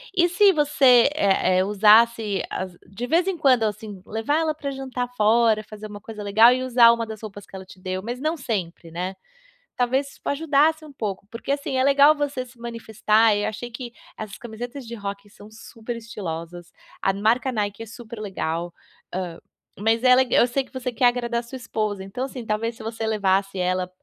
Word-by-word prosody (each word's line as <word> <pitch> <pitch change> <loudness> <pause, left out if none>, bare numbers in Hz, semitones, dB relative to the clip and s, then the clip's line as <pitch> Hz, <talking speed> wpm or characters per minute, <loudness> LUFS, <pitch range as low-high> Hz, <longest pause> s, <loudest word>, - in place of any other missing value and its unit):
E 350 -1 +4
se 395 +3 +5
você, 280 -6 +5
eh 190 -7 +2
eh, - - +3
usasse 210 +1 +4
as 185 -1 -5
de 215 +6 -5
vez 335 +7 +2
em 380 -3 -1
quando, 260 -6 +4
assim, 210 -2 -5
levar 225 +8 0
ela 315 -2 0
para 280 -2 -5
jantar 260 -2 -4
fora, 220 0 +3
fazer 215 0 -10
uma 205 -1 -9
coisa 210 -1 -8
legal 220 +4 +6
e 255 +1 0
usar 240 -2 +6
uma 230 -1 -1
das 220 -1 -8
roupas 205 -2 -9
que - - -14
ela 190 - -7
te 185 - -15
deu, 185 0 -4
mas 240 +5 -5
não 310 +3 -1
sempre, 190 - -4
né. 180 +3 -4 0.6
Talvez, 260 +3 0
isso - - -19
ajudasse 310 +1 +2
um 300 - -12
pouco 205 -6 -5
porque, 230 +4 -7
assim, 280 -1 -1
é 260 - +3
legal 280 +2 +6
você 280 -3 -3
se 245 0 -18
manifestar, 225 -2 +1
eu 205 - -1
achei 240 +3 -6
que 240 0 -8 0.2
as 215 -2 -8
camisetas 240 +3 -8
de 235 - -7
rock 200 -1 -6
são 205 +1 -15
super 225 +1 -8
estilosas, 175 -6 -7 0.3
a 195 - +2
marca 225 +6 +1
Nike 210 -2 -3
é - - -8
super 230 0 -10
legal, 170 -4 -3 0.4
hã, 180 -2 -4 0.4
mas 225 +2 +2
ela 255 0 +6
eu 240 - +4
sei 270 +3 -1
que 260 - -23
você 260 -1 -3
quer 245 - -1
agradar 240 -1 0
sua 235 - -12
esposa, 215 -5 -3
então, 195 +7 -5
assim, 255 -3 -7
talvez 225 +2 -2
se - - -11
você 225 0 -4
levasse 195 -2 +1
ela 180 0 0
225 Hz, 200 wpm, -23 LUFS, 205-255 Hz, 0.6 s, legal